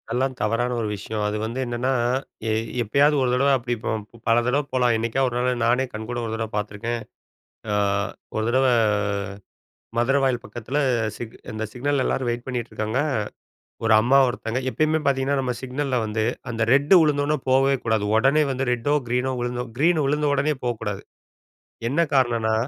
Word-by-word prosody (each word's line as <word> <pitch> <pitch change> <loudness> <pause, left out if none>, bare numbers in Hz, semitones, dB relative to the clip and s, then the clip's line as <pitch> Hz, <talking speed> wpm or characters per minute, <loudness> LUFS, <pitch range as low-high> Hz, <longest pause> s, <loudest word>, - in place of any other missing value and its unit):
அதெல்லாம் 130 +3 -1
தவறான 120 +3 0
ஒரு 110 - -1
விஷயம். 105 +2 -4
அது 105 +1 -2
வந்து 115 +4 -4
என்னன்னா 120 +2 -1 0.6
எ - - +1 0.3
எப்பயாவது 140 +7 +3
ஒரு 125 - +1
தடவை 140 +3 +3
அப்படி 120 -1 -3
போ - - -2 0.4
பல 115 0 +4
தடவை 135 +4 +1
போலாம். 125 -2 +3
என்னைக்காவது 115 +4 0
ஒரு 120 - -3
நாள் 125 -1 0
நானே 125 +3 +2
கண்கூட 110 +3 -5
ஒரு 110 - -4
தடவை 110 -1 -3
பார்த்துருக்கேன். 105 +3 -3 0.7
அ - - +1 0.6
ஒரு 110 - 0
தடவ 130 +2 +3 1.3
மதுரவாயல் 130 0 +2
பக்கத்தில் 120 +6 -4 0.4
சிக் 115 -1 -8 0.2
அந்த 110 +1 -4
சிக்னல்ல 135 +2 0
எல்லாரும் 130 -2 0
வெயிட் 120 +1 -3
பண்ணிகிட்டுருக்காங்க. 120 -2 -2 0.9
ஒரு 110 - +3
அம்மா 130 +5 +4
ஒருத்தவங்க 120 0 -2
எப்பயுமே 155 +3 +1
பார்த்தீங்கன்னா 135 0 +1
நம்ம 125 -2 -2
சிக்னல்ல 130 +1 -2
வந்து 110 0 -1 0.3
அந்த 115 -1 -2
ரெட் 140 +5 +3
விழுந்தோனே 150 0 +1
போவே 135 +1 +4
கூடாது. 110 -2 +1
உடனே 135 +6 +4
வந்து 130 +1 -2
ரெட்டோ 125 +5 0
கிரீனோ 125 +2 0
விழுந்தோ 120 0 -2
கிரீன் 160 +1 +3
விழுந்த 150 +1 +1
உடனே 145 +2 +1
போக்கூடாது. 110 -4 -3 0.9
என்ன 145 +7 +1
காரணம்ன்னா, 115 -4 +2
125 Hz, 155 wpm, -23 LUFS, 115-135 Hz, 1.3 s, பல